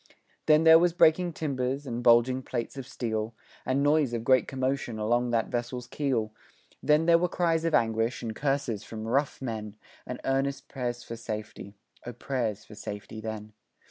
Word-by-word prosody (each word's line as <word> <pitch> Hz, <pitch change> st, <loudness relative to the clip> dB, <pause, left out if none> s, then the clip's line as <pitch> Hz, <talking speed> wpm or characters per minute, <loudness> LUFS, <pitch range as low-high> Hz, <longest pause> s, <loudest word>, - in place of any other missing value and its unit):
Then 155 Hz, 0 st, +6 dB
there 160 Hz, 0 st, +9 dB
was 175 Hz, 0 st, +3 dB
breaking 175 Hz, +1 st, +4 dB
timbers, 135 Hz, -2 st, -2 dB
and 120 Hz, -2 st, -4 dB
bulging 120 Hz, +2 st, +4 dB
plates 120 Hz, -1 st, -4 dB
of 135 Hz, -2 st, -7 dB
steel, 110 Hz, -2 st, -3 dB, 0.3 s
And 135 Hz, +2 st, +1 dB
noise 145 Hz, -3 st, +3 dB
of 115 Hz, -1 st, -2 dB
great 130 Hz, +1 st, +4 dB
commotion 130 Hz, -3 st, -2 dB
along 120 Hz, +3 st, +1 dB
that 115 Hz, -2 st, 0 dB
vessel's 125 Hz, 0 st, -3 dB
keel 120 Hz, -7 st, -1 dB, 0.5 s
Then 150 Hz, +2 st, +3 dB
there 170 Hz, 0 st, +6 dB
were 180 Hz, +1 st, +1 dB
cries 165 Hz, -2 st, +1 dB
of 165 Hz, -, +2 dB
anguish, 115 Hz, +1 st, +1 dB
and 110 Hz, -2 st, -4 dB
curses 135 Hz, -6 st, -1 dB
from 110 Hz, 0 st, -7 dB
rough 135 Hz, +3 st, 0 dB
men, 110 Hz, -4 st, -5 dB, 0.3 s
And 125 Hz, -, -5 dB
earnest 135 Hz, +1 st, -1 dB
prayers 120 Hz, -2 st, -4 dB
for 115 Hz, -, -7 dB
safety 110 Hz, -3 st, -7 dB, 0.3 s
O 120 Hz, -, -6 dB
prayers 115 Hz, -4 st, -3 dB
for -, -, -13 dB
safety 105 Hz, +1 st, -7 dB
then. 110 Hz, -1 st, -6 dB
125 Hz, 175 wpm, -28 LUFS, 115-140 Hz, 0.5 s, there